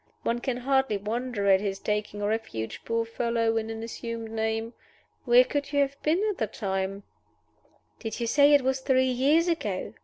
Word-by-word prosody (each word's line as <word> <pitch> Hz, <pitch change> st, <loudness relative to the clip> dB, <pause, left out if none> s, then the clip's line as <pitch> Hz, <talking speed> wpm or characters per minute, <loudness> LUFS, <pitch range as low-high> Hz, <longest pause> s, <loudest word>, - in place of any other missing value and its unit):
One 235 Hz, +1 st, 0 dB
can 245 Hz, 0 st, -2 dB
hardly 265 Hz, -3 st, +1 dB
wonder 220 Hz, +1 st, -3 dB
at 195 Hz, -1 st, +5 dB
his 195 Hz, -2 st, -2 dB
taking 210 Hz, 0 st, -3 dB
refuge, 205 Hz, -, -3 dB
poor 230 Hz, 0 st, 0 dB
fellow, 230 Hz, 0 st, 0 dB
in 220 Hz, 0 st, -2 dB
an 225 Hz, 0 st, -5 dB
assumed 230 Hz, -1 st, -6 dB
name. 225 Hz, +1 st, -2 dB, 0.5 s
Where 245 Hz, 0 st, +7 dB
could 285 Hz, +2 st, -3 dB
you 285 Hz, -1 st, +3 dB
have 280 Hz, 0 st, -2 dB
been 330 Hz, +6 st, +1 dB
at 400 Hz, -, -8 dB
the 220 Hz, -, 0 dB
time?" 195 Hz, -1 st, -3 dB, 1.0 s
"Did 225 Hz, 0 st, -5 dB
you 235 Hz, -, -1 dB
say 285 Hz, +4 st, +5 dB
it 280 Hz, -, +3 dB
was 265 Hz, +1 st, +1 dB
three 260 Hz, -1 st, +2 dB
years 290 Hz, +7 st, +3 dB
ago?" 215 Hz, -, -2 dB
230 Hz, 180 wpm, -27 LUFS, 215-265 Hz, 1.0 s, Where